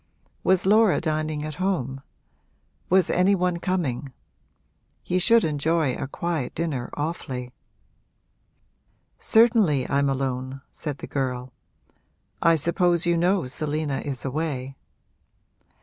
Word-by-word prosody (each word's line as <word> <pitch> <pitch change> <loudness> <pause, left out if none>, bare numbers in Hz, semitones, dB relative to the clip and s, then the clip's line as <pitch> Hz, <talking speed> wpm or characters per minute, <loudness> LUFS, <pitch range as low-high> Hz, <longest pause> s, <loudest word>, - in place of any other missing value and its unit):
Was 185 -1 +3
Laura 215 0 +5
dining 155 -1 -2
at 155 +3 -6
home? 135 -9 -1 0.9
Was 185 -1 +4
any 190 +2 +3
one 180 -1 0
coming? 160 -8 -2 0.9
He 180 - 0
should 230 +5 +4
enjoy 155 -1 +1
a - - -4
quiet 160 -2 -3
dinner 150 -7 -2
awfully. 135 -5 -4 1.7
'Certainly 220 - +4
I'm 140 0 +1
alone,' 130 0 -3
said 150 -3 -5
the - - -7
girl. 125 -2 -3 0.9
'I 165 -1 +5
suppose 170 +2 +2
you 170 0 +3
know 180 +1 +2
Selina 150 +1 -2
is 140 -3 -5
away.' 135 -2 -3
155 Hz, 110 wpm, -25 LUFS, 135-175 Hz, 1.7 s, Laura